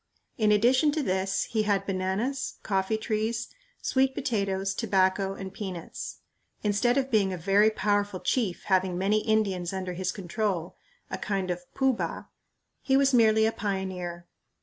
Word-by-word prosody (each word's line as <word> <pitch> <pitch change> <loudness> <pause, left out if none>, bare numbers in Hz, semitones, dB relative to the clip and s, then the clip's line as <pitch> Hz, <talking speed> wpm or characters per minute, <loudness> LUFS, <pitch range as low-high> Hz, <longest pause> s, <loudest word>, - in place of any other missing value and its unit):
In 215 -2 +2
addition 250 +8 +4
to 310 -1 0
this, 190 -2 0
he 220 -2 -1
had 200 -2 +1
bananas, 195 +8 -2
coffee 195 +2 0
trees, 220 +2 -2 0.3
sweet 265 0 +2
potatoes, 195 -6 -1
tobacco, 195 -2 +1
and 190 -1 -7
peanuts. 185 -5 -6 0.4
Instead 210 +5 +2
of 270 -1 0
being 205 -4 +3
"a 185 - -3
very 200 +5 +4
powerful 205 -3 0
chief 210 -6 -1
having 185 -2 +1
many 200 +3 +2
Indians 200 -5 0
under 185 -1 -3
his 185 +1 -2
control" 185 -2 -2 0.4
a - - -3
kind 195 -3 -1
of 175 0 -6
"Pooh 265 -1 +3
Bah" 175 -7 -4 0.6
he 270 -2 +3
was 275 -1 +3
merely 220 -2 +5
a 220 - +2
pioneer. 185 -4 -4
200 Hz, 150 wpm, -27 LUFS, 190-220 Hz, 0.6 s, merely